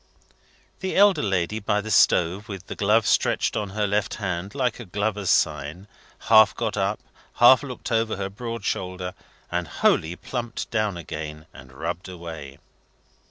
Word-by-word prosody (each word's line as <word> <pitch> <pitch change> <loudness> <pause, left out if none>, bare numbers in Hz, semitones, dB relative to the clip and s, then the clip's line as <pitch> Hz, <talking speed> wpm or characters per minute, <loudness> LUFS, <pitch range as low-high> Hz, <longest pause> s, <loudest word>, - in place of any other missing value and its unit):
The 190 -1 -3
elder 200 0 +5
lady 95 +1 0
by 105 0 0
the 110 +1 -5
stove, 95 +2 +3
with 95 -2 -7
the - - -7
glove 105 +2 +3
stretched - - +2
on 105 -2 -2
her 105 +2 -1
left 105 0 0
hand, 95 0 -4
like 125 -4 0
a 120 - -7
glover's 105 0 -2
sign, 75 +6 0 0.3
half 110 -1 +6
got 110 -2 -2
up, 100 +1 0 0.4
half 125 +2 +7
looked 130 -4 -7
over 115 -1 +1
her 95 -1 -2
broad 115 0 -6
shoulder, 90 0 -3 0.4
and 90 -1 -1
wholly 80 +4 +1
plumped 120 +3 -5
down 110 -5 0
again 75 -1 -7
and 65 0 -13
rubbed 80 +6 -5
away. 80 -6 -8
100 Hz, 160 wpm, -24 LUFS, 90-110 Hz, 0.4 s, half